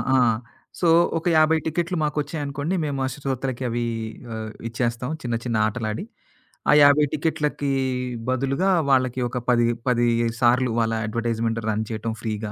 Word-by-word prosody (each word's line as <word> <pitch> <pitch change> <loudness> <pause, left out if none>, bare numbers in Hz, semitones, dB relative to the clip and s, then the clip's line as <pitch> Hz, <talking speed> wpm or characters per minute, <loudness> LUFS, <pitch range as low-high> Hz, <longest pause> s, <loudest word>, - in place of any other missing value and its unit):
ఆ! - - +5 0.6
సో, 175 - +2 0.3
ఒక 165 - -5
50 155 +1 +5
50 155 - -7
టికెట్లు 170 +2 -1
మాకొచ్చాయనుకోండి, 150 +2 -2
మేము 140 -2 -2
ఆ - - 0
శ్రోతలకి 135 -2 -3
అవి 120 +1 -1 0.5
ఆహ్, 110 -1 -5 0.2
ఇచ్చేస్తాం, 120 +2 -2
చిన్న 120 -3 -2
చిన్న 115 -2 0
ఆటలాడి. 110 - -3 0.7
ఆ - - +7
50 145 +1 +6
టికెట్లకి 150 -2 -1 0.6
బదులుగా 135 +8 +1 0.2
వాళ్ళకి 130 -2 +2
ఒక 125 - -4
పది 120 -1 +4 0.2
పది 120 -1 +3 0.3
సార్లు 125 +1 +3
వాళ్ళ 115 0 +1
అడ్వర్టైజ్‌మెంట్ 115 0 -1
రన్ 110 +1 -1
చేయటం 110 +1 -3
ఫ్రీగా. 110 -2 -3
130 Hz, 145 wpm, -23 LUFS, 115-145 Hz, 0.7 s, ఆ